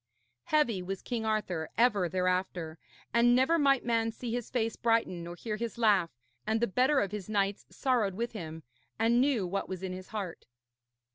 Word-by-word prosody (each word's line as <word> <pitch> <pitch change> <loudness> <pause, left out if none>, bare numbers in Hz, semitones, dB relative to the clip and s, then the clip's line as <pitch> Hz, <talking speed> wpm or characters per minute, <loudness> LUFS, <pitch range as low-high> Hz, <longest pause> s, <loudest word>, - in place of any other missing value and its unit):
Heavy 240 -11 +2
was 190 +1 -5
King 225 -2 -3
Arthur 185 -7 -1
ever 210 -7 +3
thereafter, 180 -3 -1 0.3
and 240 +1 +5
never 265 +7 +3
might 275 -4 +3
man 230 -1 +1
see 230 +1 -6
his 240 -2 -3
face 225 -3 -1
brighten 225 -7 +1
nor 170 +1 -7
hear 215 +3 -4
his 235 0 -4
laugh; 205 -7 +3 0.4
and 220 +1 +2
the 235 - +3
better 255 +7 +3
of 195 - -2
his 210 -1 -6
knights 200 -1 0
sorrowed 235 -8 0
with 235 +3 -2
him, 160 -6 -7 0.3
and 230 +2 +3
knew 260 -8 +2
what 195 +2 -3
was 185 -1 -5
in 185 -1 -3
his 185 0 -8
heart. 200 -6 -6
215 Hz, 185 wpm, -30 LUFS, 185-235 Hz, 0.4 s, and